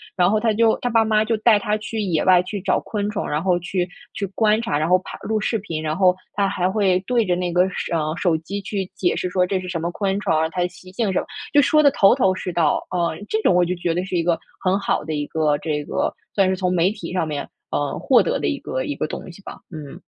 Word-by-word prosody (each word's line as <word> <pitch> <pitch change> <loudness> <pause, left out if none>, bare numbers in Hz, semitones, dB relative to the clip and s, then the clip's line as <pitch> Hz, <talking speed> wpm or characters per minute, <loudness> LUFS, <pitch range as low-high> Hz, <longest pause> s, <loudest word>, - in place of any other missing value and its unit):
然 180 -2 +3
后 215 +1 +2
他 220 0 +1
就 225 +1 +3
他 245 - -2
爸 225 0 +4
妈 215 -1 +2
就 225 +1 +1
带 220 0 +5
他 210 +1 -1
去 215 +1 -5
野 175 -6 0
外 180 -1 +6
去 200 +2 -5
找 - - +1
昆 205 -1 -3
虫， 210 -1 -3
然 150 +2 -1
后 180 -2 +2
去， 180 +1 -2 0.3
去 200 - -3
观 215 0 +3
察， 185 -11 -1
然 155 +2 0
后 180 +1 +4
拍 - - -9
录 220 0 0
视 225 - 0
频。 170 -7 -5
然 155 0 -2
后 185 -1 +4 0.2
他 200 0 +1
还 185 -1 0
会 190 -2 +2
对 240 -3 +2
着 180 -2 +1
那 180 0 -2
个 180 +2 +3
手 175 -2 -2
呃， 155 0 -1
手 170 -2 +1
机 195 +6 -5
去 195 -1 -3
解 175 - +1
释 - - -2
说， 180 0 +2
这 190 0 0
是 185 - -7
什 175 -2 -3
么 170 - -1
昆 195 +1 -1
虫 205 -3 -1
啊， 160 +1 +2
它 180 +2 -3
的 175 - +2
习 180 +1 -15
性 205 +1 -1
什 185 - +1
么， - - -4 0.3
就 290 - +5
说 305 +3 +4
得 290 - +6
头 195 -7 +5
头 215 -8 +2
是 180 -1 -5
道。 165 -3 +1
呃， 170 -3 -1
这 220 - 0
种 185 - +3
我 180 0 +4
就 175 - -1
觉 175 -1 -1
得 175 +2 -1
是 185 - -4
一 170 - +1
个 170 -1 +1 0.2
很 185 +1 +2
好 200 - -1
的 155 +1 -4
一 145 0 -2
个， 155 -2 +1
这 150 -1 -2
个， - - -1 0.2
算 195 -2 +4
是 190 - +1
从 180 -1 -1
媒 180 +2 +3
体 205 -6 -7
上 180 -3 -1
面， 145 -2 -4 0.2
呃， 145 -1 -1
获 - - +4
得 - - 0
的 - - -1
一 70 - -1
个 130 - -3
一 145 - -3
个 - - -2
东 170 - -7
西 175 - -15
吧， - - -9
嗯。 150 -4 -9
185 Hz, 305 characters per minute, -22 LUFS, 170-205 Hz, 0.3 s, 外